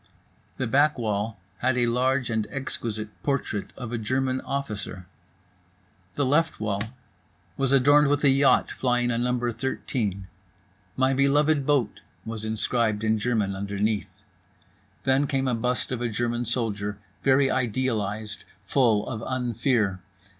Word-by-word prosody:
The 130 - -1
back 145 +6 +3
wall 110 -1 -2 0.2
had 125 0 +1
a 120 - +3
large 125 +1 +1
and 110 -2 0
exquisite 110 -5 -4
portrait 135 -7 -2
of 120 -3 -6
a 120 - -2
German 130 +3 0
officer. 105 -9 -4 1.1
The 145 - +1
left 155 +5 +2
wall 100 -2 -1 0.7
was 135 -1 0
adorned 145 +2 +6
with 145 +1 +1
a 140 - +6
yacht, 135 -1 +4
flying 125 -1 +1
a 115 - 0
number 120 0 0
13. 110 -5 -3 0.7
"My 130 +1 +3
beloved 140 +1 +3
boat" 135 -8 +1 0.3
was 110 -1 -5
inscribed 110 0 0
in 110 0 +2
German 105 -4 0
underneath. 100 0 -2 0.8
Then 135 +2 +3
came 135 -2 0
a 125 - +1
bust 125 +3 -1
of 125 -2 -2
a 120 - 0
German 120 +2 -1
soldier, 105 -4 -2 0.2
very 135 0 +4
idealized, 110 -4 -1 0.2
full 110 -3 +2
of 110 -4 -4
unfear. 120 -5 0
120 Hz, 135 wpm, -26 LUFS, 110-130 Hz, 1.1 s, adorned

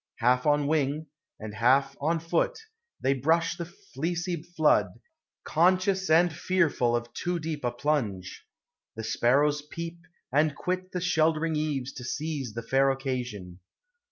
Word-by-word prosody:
Half 125 +3 +2
on 145 -1 +3
wing, 150 0 0 0.3
And 110 -1 -7
half 135 +5 +3
on 165 +3 +1
foot, - - 0 0.4
they 135 - +3
brush 165 +6 +1
the 170 -1 -5
fleecy 170 +2 -4
flood, 155 - +2 0.6
Conscious 185 +3 +2
and 165 +1 +5
fearful 155 -8 +1
of 120 0 -4
too 175 0 -2
deep 155 -3 -4
a 120 - +2
plunge. 120 -8 -2 0.5
The 110 - -5
sparrows 145 +6 +2
peep, 165 +3 -7 0.3
and 150 +1 +3
quit 185 +1 -3
the 180 - -3
sheltering 160 -2 +2
eaves 145 -4 -2
To 125 - -8
seize 145 -3 -3
the 115 - -4
fair 135 +3 +3
occasion. 125 -9 -4
150 Hz, 140 wpm, -28 LUFS, 125-165 Hz, 0.6 s, and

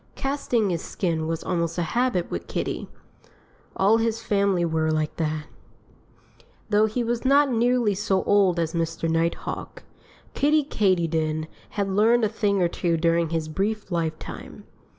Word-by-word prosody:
Casting 250 -7 0
his 170 -2 -2
skin 165 -4 -2
was 165 0 -3
almost 170 -2 -1
a 175 - +1
habit 210 0 0
with - - -4
Kiddie. - - -3 0.9
All 205 +4 +4
his 225 0 0
family 200 -5 +1
were 160 -1 0
like 155 -1 -1
that. 155 -1 -1 1.3
Though 210 +1 +4
he 235 +3 -2
was 235 0 -2
not 280 +1 +4
nearly 240 -2 +2
so 190 -1 0
old 195 -4 +3
as 165 -1 -1
Mr. 165 -1 -2
Nighthawk, 165 +1 -2 0.5
Kiddie 300 +2 +3
Katydid 165 - 0 0.3
had 200 -1 +1
learned 220 +5 +3
a - - 0
thing 200 -3 +1
or - - +4
two 170 0 -1
during 165 0 +2
his 165 -1 -2
brief 200 +5 -2
lifetime. 165 -2 -4
185 Hz, 150 wpm, -24 LUFS, 165-220 Hz, 1.3 s, All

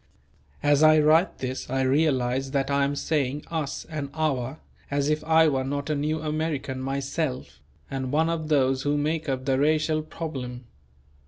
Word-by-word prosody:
As 145 0 +4
I 155 0 +7
write 155 +5 +4
this 130 0 -4
I 135 +1 0
realize 130 -2 +1
that 135 0 -1
I 140 0 +3
am 140 +1 -1
saying 145 -1 -1
"us" 155 -4 -3
and 150 -4 -4
"our" 140 -3 -1 0.3
as 140 0 0
if 155 0 0
I 160 0 +5
were 135 -3 +1
not 140 +2 -3
a - - +1
New 155 +2 -1
American 155 -4 -2
myself 135 - -3 0.3
and 130 -1 -4
one 160 +2 +2
of 165 -2 -2
those 135 -3 +2
who 145 +1 0
make 155 +1 -1
up 130 -1 -2
the 135 -1 +1
racial 155 +1 +2
problem. 130 -6 -6
145 Hz, 170 wpm, -26 LUFS, 135-155 Hz, 0.3 s, I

